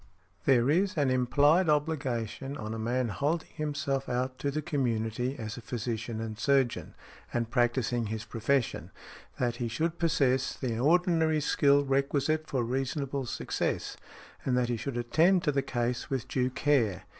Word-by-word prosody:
There 125 -2 +4
is 185 +3 +1
an 140 -3 +2
implied 145 +7 +3
obligation 140 -3 -1
on 110 -4 -5
a 115 - -4
man 120 +2 0
holding 150 +10 -1
himself 145 -3 -2
out 130 +1 -2
to 140 - -1
the 150 +2 -2
community 125 -3 -1
as 110 -3 -5
a - - -7
physician 115 -1 -4
and 110 -1 -5
surgeon, 135 0 +1 0.4
and 115 -1 -2
practising 120 -1 +1
his 110 +1 -4
profession, 120 +3 -1 0.5
that 120 -1 -1
he 120 - -2
should 160 +8 -2
possess 135 -6 +2
the 120 -4 -3
ordinary 160 +1 +3
skill 140 -1 +3
requisite 140 +3 +1
for 130 -3 -1
reasonable 135 +2 -2
success, - - -2 0.5
and 125 -2 +1
that 125 -1 +1
he 120 - +1
should 130 +2 -4
attend 165 +10 +3
to 150 - +2
the 140 -1 +1
case 125 -2 -2
with 135 -3 -2
due 130 -1 0
care. 125 -9 +1
130 Hz, 155 wpm, -29 LUFS, 120-145 Hz, 0.5 s, There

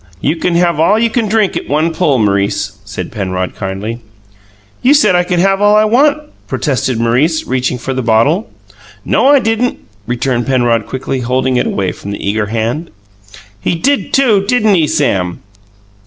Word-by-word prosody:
"You 155 - 0
can 170 +1 -1
have 170 -2 +2
all 195 +7 +3
you 230 0 +1
can 230 -2 0
drink 215 -2 +1
at - - -5
one 155 +3 +1
pull, 155 -5 +1
M'rice," 100 -1 0
said 95 -2 -7
Penrod 95 -3 -3
kindly. 100 +4 -5 0.8
"You 275 +4 +4
said 285 -10 +4
I 175 - +3
could 175 0 -2
have 195 +2 +2
all 205 0 +4
I 215 0 +4
want!" 280 +7 +3 0.3
protested 130 -5 -1
Maurice, 130 +8 +1
reaching 130 0 -1
for 130 +2 -4
the 130 - -2
bottle. 125 - +1 0.6
"No, - - +2
I 285 0 +6
didn't," 235 0 0 0.3
returned 120 0 -1
Penrod 120 -4 +1
quickly, 130 0 -3
holding 130 +1 0
it - - 0
away 95 -2 -1
from 100 - -9
the 100 0 -5
eager 105 +1 0
hand. 115 +9 -2 0.7
"He - - 0
did, 275 +11 0
too! 230 -8 +3
Didn't 220 -3 +2
he, 165 -5 +2
Sam?" 95 -13 -1
135 Hz, 175 wpm, -14 LUFS, -, 0.8 s, I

